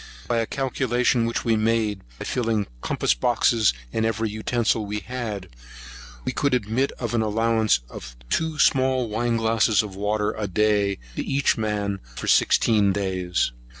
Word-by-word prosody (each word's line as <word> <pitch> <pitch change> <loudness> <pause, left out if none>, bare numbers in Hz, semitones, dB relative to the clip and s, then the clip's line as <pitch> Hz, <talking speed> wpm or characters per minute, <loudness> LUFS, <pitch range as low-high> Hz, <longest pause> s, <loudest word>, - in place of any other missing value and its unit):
By 120 - +1
a 115 - -1
calculation 125 -2 0
which 115 - -2
we 115 -1 +3
made, 110 -2 0 0.2
by - - -6
filling 115 -4 0
the - - -16
compass - - +1
boxes, 115 - +2 0.2
and 110 - 0
every 110 -1 -1
utensil 110 +1 0
we 105 0 -4
had, 110 -6 -5 0.8
we - - 0
could 140 -3 +1
admit 125 +4 0
an 120 -2 -1
allowance 110 - +2
of - - -10
two 160 - -1
small 130 -4 +3
wine 115 +2 0
glasses 110 -2 +2
of 100 -3 -8
water 105 +1 0
a 105 -1 -4
day 100 0 +1 0.2
to - - -2
each 140 0 +1
man 105 -2 -2 0.2
for - - -5
sixteen 105 -3 +4
days. 95 -6 -1
110 Hz, 155 wpm, -24 LUFS, 105-120 Hz, 0.8 s, sixteen